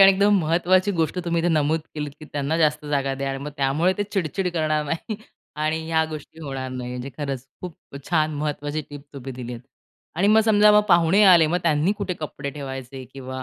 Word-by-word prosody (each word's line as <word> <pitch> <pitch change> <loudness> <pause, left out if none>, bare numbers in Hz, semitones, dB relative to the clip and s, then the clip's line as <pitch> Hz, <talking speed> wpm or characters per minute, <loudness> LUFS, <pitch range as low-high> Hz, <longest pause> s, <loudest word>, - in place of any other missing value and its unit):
आणि 195 0 +10
एकदम 200 +1 +4
महत्त्वाची 180 +4 +2
गोष्ट 165 +3 0
तुम्ही 170 -1 0
इथे 175 - +2
नमूद 155 0 +2
केलीत, 150 -1 -4
की - - -9
त्यांना 145 +2 -1
जास्त 150 -1 +2
जागा 140 -2 0
द्या 135 0 -3
आणि 135 - -4
मग 150 - -5
त्यामुळे 145 +6 +2
ते - - +2
चिड-चिड 190 -1 -1
करणार 155 -2 0
नाही. 165 +8 -4 0.4
आणि 155 +1 0
ह्या 160 0 +2
गोष्टी 155 +1 -9
होणार 135 -3 -4
नाही, 125 -1 -5
म्हणजे 125 +2 -5
खरंच 135 -3 -3 0.2
खूप 180 -3 -7 0.4
छान, 155 -2 +2
महत्त्वाची 145 0 -3
टिप 145 -1 -8
तुम्ही 135 -1 -7
दिलीत. 125 -1 -7 0.5
आणि 190 +6 +2
मग 220 +1 +6
समजा, 210 -1 +6
मग 210 - +7
पाहुणे 175 +3 +5
आले, 175 -5 +7
मग 170 +3 +1
त्यांनी 160 +3 +2
कुठे 200 -3 -2
कपडे 145 -2 -5
ठेवायचे 135 -2 -7
किंवा 130 -1 -6
155 Hz, 200 wpm, -23 LUFS, 140-175 Hz, 0.5 s, आणि